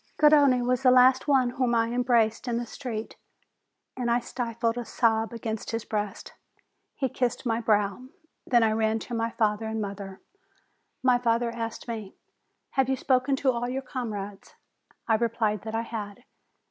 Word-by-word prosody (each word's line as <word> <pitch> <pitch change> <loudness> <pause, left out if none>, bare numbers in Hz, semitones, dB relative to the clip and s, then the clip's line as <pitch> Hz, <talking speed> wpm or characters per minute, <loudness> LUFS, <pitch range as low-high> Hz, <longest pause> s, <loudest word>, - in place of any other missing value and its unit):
Garrone 285 -5 +5
was 250 0 +1
the 260 - +5
last 255 +2 +5
one 260 -4 +3
whom 245 -1 0
I 230 0 +2
embraced 240 -2 +1
in 235 -1 0
the 240 - -2
street, 230 -2 -6 0.8
and 245 -2 -2
I 235 +1 +3
stifled 230 -1 -2
a 245 - -3
sob 225 -1 +1
against 225 -2 -5
his 225 -1 -3
breast. 210 -2 -4 0.6
He 265 - 0
kissed 250 0 -2
my 230 -1 0
brow. 210 +1 +1 0.4
Then 240 -3 +4
I 220 - +3
ran 220 0 +1
to 240 - -7
my 230 0 0
father 220 -1 0
and 220 0 -3
mother. 200 -2 -6 0.8
My 250 -1 +4
father 235 0 +1
asked 230 0 -5
me: 220 -4 -6 0.6
"Have 265 -1 +1
you 265 - +2
spoken 260 +1 +1
to 265 0 +2
all 240 0 -2
your 265 +2 -3
comrades?" 210 -6 -6 0.5
I 225 - +3
replied 220 -3 0
that 220 0 -4
I 225 - 0
had. 225 0 -7
235 Hz, 170 wpm, -27 LUFS, 220-250 Hz, 0.8 s, Garrone